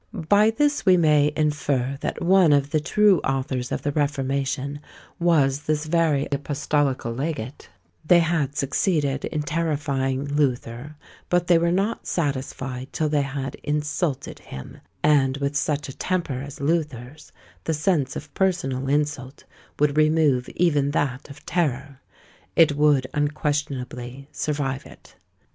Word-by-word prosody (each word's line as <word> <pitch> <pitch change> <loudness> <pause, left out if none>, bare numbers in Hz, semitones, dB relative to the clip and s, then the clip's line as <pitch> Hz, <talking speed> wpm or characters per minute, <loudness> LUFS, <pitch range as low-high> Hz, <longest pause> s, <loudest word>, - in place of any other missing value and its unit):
By 205 +3 +5
this 290 +6 +1
we 185 -2 +5
may 150 -3 +4
infer 140 -3 0
that - - -3
one 180 -3 +5
of 140 0 +1
the 155 - +2
true 200 +3 +3
authors 130 -2 -2
of - - -3
the 145 - 0
reformation 140 -1 -1 0.4
was 145 -5 +3
this 155 0 0
very 155 -3 +1
apostolical 140 -3 -1
legate; 135 -2 -5 0.3
they 175 +3 +5
had 155 -4 0
succeeded 140 -1 0
in 150 -2 -2
terrifying 145 -4 -1
Luther; 140 -1 -2 0.3
but 175 0 +2
they 175 -1 +5
were 170 0 +1
not 195 +5 -1
satisfied 130 -4 -3
till 155 -1 -1
they 150 -1 +2
had 135 -1 -4
insulted 150 0 -2
him; 65 - -10 0.2
and 140 -3 +3
with 140 0 -2
such 145 +1 -1
a 135 - -8
temper 170 -8 -2
as 140 0 -9
Luther's, 145 -3 -3 0.3
the 160 - 0
sense 150 -3 0
of - - -8
personal 135 -9 0
insult 145 -2 -1 0.3
would 145 0 +1
remove 155 -5 +3
even 145 -5 +2
that 145 -2 -2
of 140 +1 -13
terror; 140 -5 -2 0.5
it 160 -2 +6
would 145 -3 +3
unquestionably 140 -3 -3
survive 140 -3 -2
it. - - -17
145 Hz, 135 wpm, -24 LUFS, 135-155 Hz, 0.5 s, it